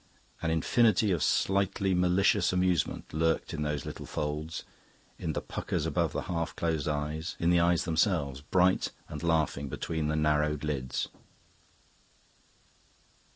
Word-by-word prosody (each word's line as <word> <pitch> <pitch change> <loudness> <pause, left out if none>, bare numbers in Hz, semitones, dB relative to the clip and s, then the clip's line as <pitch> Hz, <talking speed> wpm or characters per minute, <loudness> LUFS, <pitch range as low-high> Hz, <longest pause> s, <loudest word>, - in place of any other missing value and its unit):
An 80 - 0
infinity 105 +5 +3
of 85 -4 0
slightly 95 0 +1
malicious 90 +2 +3
amusement 90 -2 0
lurked 80 +1 0
in 80 - -3
those 75 -3 -2
little - - -7
folds, 75 +2 -3 0.6
in - - -2
the - - -2
puckers - - -3
about - - 0
the - - -3
half 85 -2 -3
closed 80 -4 -1
eyes, 75 +2 -2
in 85 +1 +3
the 85 - +5
eyes 85 0 +3
themselves, 80 -5 +1
bright 90 +5 +2 0.2
and 75 - -7
laughing 80 -4 0
between 80 +3 -2
the 75 - 0
narrowed 75 -1 +1
lids. 65 -4 -2
80 Hz, 135 wpm, -30 LUFS, 75-90 Hz, 0.6 s, the